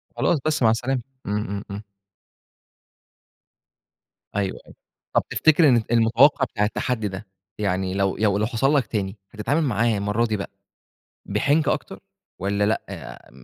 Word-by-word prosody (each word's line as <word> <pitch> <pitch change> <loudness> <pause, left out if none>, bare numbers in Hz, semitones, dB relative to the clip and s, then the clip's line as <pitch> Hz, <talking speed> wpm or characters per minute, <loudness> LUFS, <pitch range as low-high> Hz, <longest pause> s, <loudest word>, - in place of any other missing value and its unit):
خلاص، 165 - +2
بس 155 -4 +1
مع 115 - +6
السلامة، 125 +3 -1 0.2
إمم، 105 +1 -2
إمم، 100 0 -4
إمم. 100 +2 -6 2.5
أيوه 100 -2 -1
أيوه، - - -16 0.4
طَب - - +3
تفتكر 160 -1 +4
إن 120 -3 +4
المتوقّع 120 +5 +4
بتاع 105 -4 -1
التحدّي 110 0 -1
ده، 100 +2 -7 0.3
يعني 95 -2 -1
لو 95 0 0
ي - - -7
لو 105 -1 +2
حصل 135 +5 +1
لك 140 - +2
تاني، 100 -1 -3
هتتعامِل 135 +8 0
معاه 115 -4 +1
المَرّة 105 +3 0
دي 110 -2 -1
بقى 100 - -5 0.8
بحنكة 150 +2 +2
أكتر، - - -7 0.4
والّا 100 +2 0
لأ، 105 +2 -4
110 Hz, 145 wpm, -23 LUFS, 100-130 Hz, 2.5 s, مع